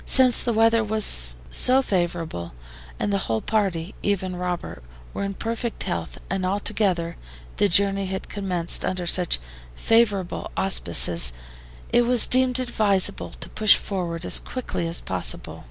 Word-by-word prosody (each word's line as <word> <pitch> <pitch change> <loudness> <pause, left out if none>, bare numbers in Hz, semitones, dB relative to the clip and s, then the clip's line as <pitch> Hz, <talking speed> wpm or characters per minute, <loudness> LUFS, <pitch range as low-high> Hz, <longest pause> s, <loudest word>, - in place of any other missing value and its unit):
Since 255 -2 +5
the 240 - -1
weather 225 0 +3
was 65 - +1
so 260 +1 +4
favorable, 170 - -3 0.5
and 205 - -1
the 200 - +1
whole 110 -1 0
party, 190 - -2
even 190 -2 -1
Robert, 180 - -5 0.3
were - - -4
in 200 0 -4
perfect 230 +2 -4
health, 85 -1 -4
and 190 0 -3
altogether 185 -3 -1 0.4
the 205 - +2
journey 195 +1 +2
had 190 0 -5
commenced 185 -4 -1
under 185 -1 -2
such 175 0 +3 0.4
favorable 205 - +1
auspices, 85 - +3 0.6
it 240 0 +3
was 245 -2 +4
deemed 255 -1 +3
advisable 205 -6 0
to - - -3
push 215 -1 +5
forward 175 -3 -4
as - - +3
quickly 240 -9 -5
as 165 0 0
possible. 90 -10 -3
195 Hz, 140 wpm, -23 LUFS, 170-220 Hz, 0.6 s, Since